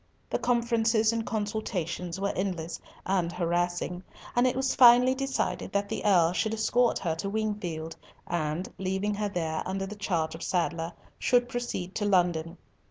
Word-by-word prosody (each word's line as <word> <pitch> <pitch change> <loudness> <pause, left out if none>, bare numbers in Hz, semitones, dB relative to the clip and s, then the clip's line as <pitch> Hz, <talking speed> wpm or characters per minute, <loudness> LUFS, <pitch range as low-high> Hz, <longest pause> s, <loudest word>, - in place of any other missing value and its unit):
The - - 0
conferences 230 -2 +2
and 225 -1 -2
consultations 190 -5 -3
were 200 0 0
endless, 175 -4 -3 0.2
and 185 -3 +1
harassing, 175 0 -1 0.3
and 245 +1 +4
it 250 - 0
was 265 0 +1
finally 245 +1 +7
decided 270 0 -2
that 200 0 0
the - - -3
Earl 175 -5 +4
should 220 +4 0
escort 240 +2 +2
her 165 -3 -1
to 195 +4 -3
Wingfield, 200 -7 -3 0.3
and, 170 +1 -2
leaving 190 +2 -1
her 205 0 -1
there 160 -4 -2
under 195 +1 -3
charge 185 -6 -2
of 165 - -9
Sadler, 170 -2 -1 0.3
should 245 0 +3
proceed 240 -7 -4
to 205 - -1
London. 175 -3 +1
195 Hz, 155 wpm, -28 LUFS, 175-225 Hz, 0.3 s, finally